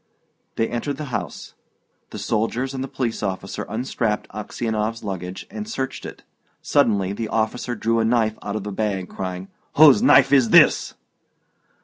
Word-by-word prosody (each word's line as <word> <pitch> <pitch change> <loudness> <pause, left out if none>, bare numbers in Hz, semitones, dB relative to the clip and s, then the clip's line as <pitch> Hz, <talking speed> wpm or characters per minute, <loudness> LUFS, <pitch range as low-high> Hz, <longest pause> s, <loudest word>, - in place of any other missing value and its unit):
They 115 - +1
entered 135 +4 -3
the 150 - -5
house. - - -5 0.6
The - - -8
soldiers 115 +5 -1
and 130 -1 -3
the - - -4
police 120 -4 -3
officer 95 -1 -4
unstrapped 110 -3 -2
Aksionov's 110 +1 -3
luggage 90 -2 -5
and 215 +1 -6
searched 135 -11 -4
it. - - -11 0.4
Suddenly 100 -9 +2
the 110 +2 -4
officer 115 +3 -1
drew 115 +1 0
a - - +2
knife 110 -1 +1
out 100 - -4
of 105 -2 -4
a 105 - -4
bag, 95 -2 -2
crying, 95 0 -5 0.2
"Whose 155 +6 +7
knife 250 - +6
is 130 -5 +5
this?" - - +5
110 Hz, 155 wpm, -22 LUFS, 100-125 Hz, 0.6 s, Whose